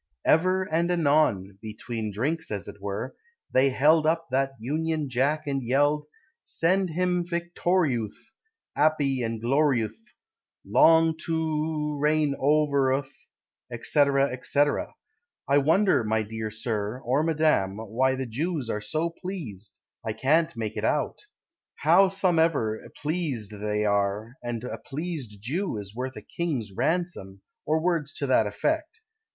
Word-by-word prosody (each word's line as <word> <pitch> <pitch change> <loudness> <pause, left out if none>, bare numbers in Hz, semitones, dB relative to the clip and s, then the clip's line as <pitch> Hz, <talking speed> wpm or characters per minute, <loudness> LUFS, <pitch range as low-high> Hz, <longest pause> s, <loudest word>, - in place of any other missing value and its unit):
Ever 185 +3 +3
and 170 -1 0
anon 140 - +2
(Between 110 0 -5
drinks, 155 +11 -2
as 100 -2 -4
it 100 - -10
were), 100 +5 -4 0.4
They 130 +1 +4
held 155 +4 +4
up 165 0 0
That 135 +1 +1
Union 155 +4 -2
Jack 140 +5 0
And 140 -1 -1
yelled: 145 +4 +1 0.4
"Shend 185 +3 +1
him 180 +1 0
victoriouth, 170 - -1 0.4
'Appy 145 -3 +2
and 115 -1 -2
gloriouth, 130 - +1 0.7
Long 165 0 +5
to 165 - 0 0.6
o - - -5
reign 150 -1 +2
over 140 -2 +3
uth, 135 +1 -2 0.7
&c., 150 - +1 0.4
&c." 140 - -1 0.9
I 140 +1 +4
wonder, 160 - +3
my 110 0 0
dear 110 +1 -5
Sir, 110 +1 -3
or 130 +5 +2
Madam, 155 -12 +1
Why 120 +5 0
the 130 0 -3
Jews 140 +2 -2
are 105 - -3
so 160 +8 -1
pleased: 145 - -7 0.3
I 110 -1 -2
can't 155 +5 +1
make 110 -2 -4
it - - -3
out. - - -1 0.6
Howsomever, 165 - +3
Pleased 145 - -2
they 105 0 -2
are, 100 +2 0
And 120 -1 -4
a 125 - -5
pleased 145 - -6
Jew 155 - -2
Is 100 -1 -8
worth 130 +2 -4
a - - -9
king's 140 - -3
ransom, 125 - -2 0.2
Or 155 +2 +2
words 165 -4 0
to 140 - -2
that 125 -5 +3
effect. 315 - -2
140 Hz, 135 wpm, -26 LUFS, 110-160 Hz, 0.9 s, Long